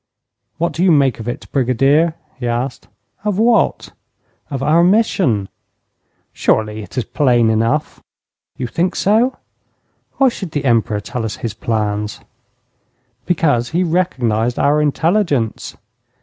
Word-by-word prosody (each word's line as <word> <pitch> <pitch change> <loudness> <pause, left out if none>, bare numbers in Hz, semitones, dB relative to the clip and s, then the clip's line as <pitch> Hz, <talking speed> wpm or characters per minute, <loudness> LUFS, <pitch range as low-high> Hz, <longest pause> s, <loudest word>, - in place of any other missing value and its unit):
'What 170 +1 0
do 170 - -1
you 190 - +4
make 140 -6 +3
of 115 - -7
it, 120 - -4
Brigadier?' 140 +5 +2 0.2
he 120 - -3
asked. 120 +2 -3 0.4
'Of 210 -3 -1
what?' 230 +2 +2 0.6
'Of 135 -3 -4
our 165 +4 +4
mission.' 180 - +2 0.9
'Surely 110 0 0
it 105 - -11
is 125 - +1
plain 120 -6 +2
enough.' 115 +7 -1 0.6
'You 125 - -3
think 170 +9 -1
so? 230 +6 +2 0.8
Why 270 - +4
should 190 -8 -7
the 145 -1 -2
Emperor 115 -4 +1
tell 120 +3 -5
us 110 -1 -3
his 110 - -3
plans?' 105 -2 -2 1.1
'Because 145 -9 +1
he 175 +3 0
recognized 125 -10 0
our 150 +2 +2
intelligence.' 150 - 0
135 Hz, 130 wpm, -17 LUFS, 115-170 Hz, 1.1 s, you